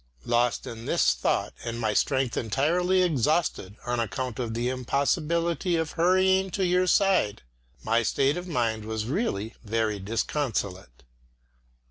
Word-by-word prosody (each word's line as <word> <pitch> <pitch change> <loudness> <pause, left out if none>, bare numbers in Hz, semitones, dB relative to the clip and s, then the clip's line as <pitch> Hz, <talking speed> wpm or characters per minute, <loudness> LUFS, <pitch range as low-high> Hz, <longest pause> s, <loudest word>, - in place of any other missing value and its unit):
Lost 120 0 +1
in 115 0 -8
this - - +3
thought - - -1
and 115 0 -4
my 110 -2 0
strength 130 -1 +1
entirely 175 - +1
exhausted 150 - 0
on 120 0 -1
account 125 +2 -3
of 115 -3 -3
the 120 +1 -1
impossibility 155 +7 0
of 160 -1 -1
hurrying 185 +2 +3
to 190 +1 -1
your 180 +1 +2
side, 180 - +2 0.4
my 115 +1 +2
state 135 +5 +1
of 180 +1 -5
mind 115 -8 -1
was 110 0 -3
really 120 - -2
very 110 -1 -1
disconsolate. 100 - -3
130 Hz, 135 wpm, -26 LUFS, 115-170 Hz, 0.4 s, this